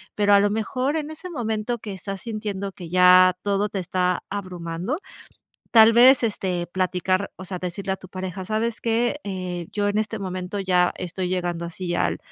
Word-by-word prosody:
Pero 205 -1 +3
a 200 - +8
lo 205 +1 +3
mejor, 255 +6 -1
en 305 -1 -3
ese 325 +4 -8
momento 235 -5 -2
que 210 -2 -6
estás 195 +1 -6
sintiendo 210 -4 -4
que 175 -3 -9
ya 180 +1 +7
todo 205 +1 0
te 200 - -5
está 180 0 0
abrumando, 185 - -4 0.7
tal 225 -1 +8
vez, 255 +2 +7
este, 185 -5 -1
platicar, 185 +2 0
o 185 - -8
sea, 185 0 -4
decirle 185 +2 -4
a - - -3
tu 185 - -13
pareja: 185 0 -5
"¿Sabes 220 +3 -2
qué?, 235 +4 +1
eh, 180 -3 -4
yo 205 -1 0
en 205 - 0
este 220 +1 -2
momento 185 +1 -4
ya 180 -2 +2
estoy 180 +1 -4
llegando 175 -2 -2
así 175 +1 -4
al - - 0
195 Hz, 185 wpm, -24 LUFS, 180-215 Hz, 0.7 s, a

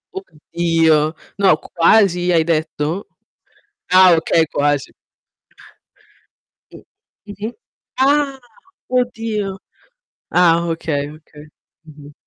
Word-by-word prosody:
Oddio, 165 - 0 0.4
no, 185 -6 +4
quasi 180 0 +2
hai 165 -2 +3
detto? 160 +2 -2 0.8
Ah 185 -1 +7
okay, 160 0 +1
quasi. 145 -1 -1 1.8
Mh, - - -13 0.5
mh-mh. 205 +3 -6 0.5
Ah, 275 0 +1 0.5
oddio. 225 -5 -2 0.8
Ah 170 -1 +3
okay, 150 -3 -3
okay. 150 -1 -15 0.4
Mh-mh. 145 -1 -14
170 Hz, 80 wpm, -18 LUFS, 155-205 Hz, 1.8 s, Ah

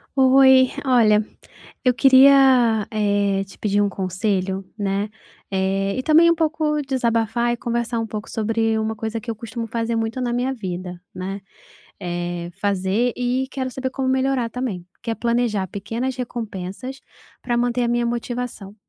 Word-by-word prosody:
Oi, 265 -1 +6
olha, 220 -5 +4 0.6
eu 250 - +5
queria, 260 -4 +6
eh, 205 -2 +1
te 195 - -15
pedir 205 -1 +1
um 205 - +2
conselho, 190 0 -2
né, 200 0 -1 0.4
eh, 195 +1 0
e - - 0
também 325 +3 +6
um - - +2
pouco 310 -2 0
desabafar 240 -3 0
e - - -4
conversar 235 0 -2
um 225 - -2
pouco 215 0 -6
sobre 225 0 0
uma 220 0 -2
coisa 220 +1 -4
que 225 +2 -9
eu 230 - -2
costumo 230 +1 -6
fazer 230 +1 -2
muito 225 +2 -2
na 240 -1 -1
minha 250 +2 0
vida, 180 -5 -6
né, 190 +2 -5 0.6
eh, 175 -1 -4
fazer, 200 +4 +1
e 250 +2 0
quero 260 -2 -3
saber 260 0 -4
como 260 0 -2
melhorar 260 -2 +1
também, 230 -8 -4 0.2
que 230 - -2
é - - -2
planejar 235 -5 0
pequenas 230 +7 -4
recompensas 235 0 -6 0.4
para 240 -1 -1
manter 245 0 +1
a - - +1
minha 240 0 +1
motivação, 235 -4 -4
230 Hz, 160 wpm, -22 LUFS, 200-255 Hz, 0.6 s, Oi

